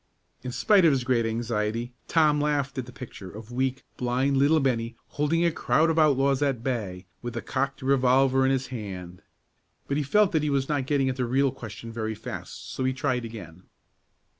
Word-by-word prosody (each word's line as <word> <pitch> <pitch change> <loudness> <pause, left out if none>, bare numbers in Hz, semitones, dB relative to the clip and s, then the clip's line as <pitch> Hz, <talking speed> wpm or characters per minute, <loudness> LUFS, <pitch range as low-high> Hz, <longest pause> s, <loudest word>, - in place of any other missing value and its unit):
In 125 - -5
spite 200 - +4
of 165 - +7
his 130 -2 0
great 120 -2 +1
anxiety, 115 +1 -2
Tom 150 -3 +3
laughed 145 -2 0
at 125 - -5
the - - -9
picture 120 -7 -9
of 110 +4 -10
weak, 130 +1 -1
blind 130 +3 +1
little 145 +4 +4
Bennie 120 -4 0
holding 160 +3 +1
a 170 - +3
crowd 155 +4 +2
of 160 - +1
outlaws 140 -2 +3
at 135 -5 0
bay, 105 -8 -3 0.2
with 120 0 -5
a - - -2
cocked 135 +1 -2
revolver 135 0 +3
in 130 - +3
his 135 -1 0
hand. 90 -6 -7 0.7
But 140 - 0
he - - +1
felt 205 +8 +3
that 160 - +2
he 150 - 0
was 135 -1 +1
not 145 -4 -1
getting 140 -2 +2
at 130 -1 -1
the 125 - 0
real 135 +3 +2
question 115 -2 -8
very 110 -1 -3
fast, - - -8
so - - -3
he 130 0 +1
tried 130 -3 -1
again. 90 -6 -10
130 Hz, 200 wpm, -26 LUFS, 115-140 Hz, 0.7 s, of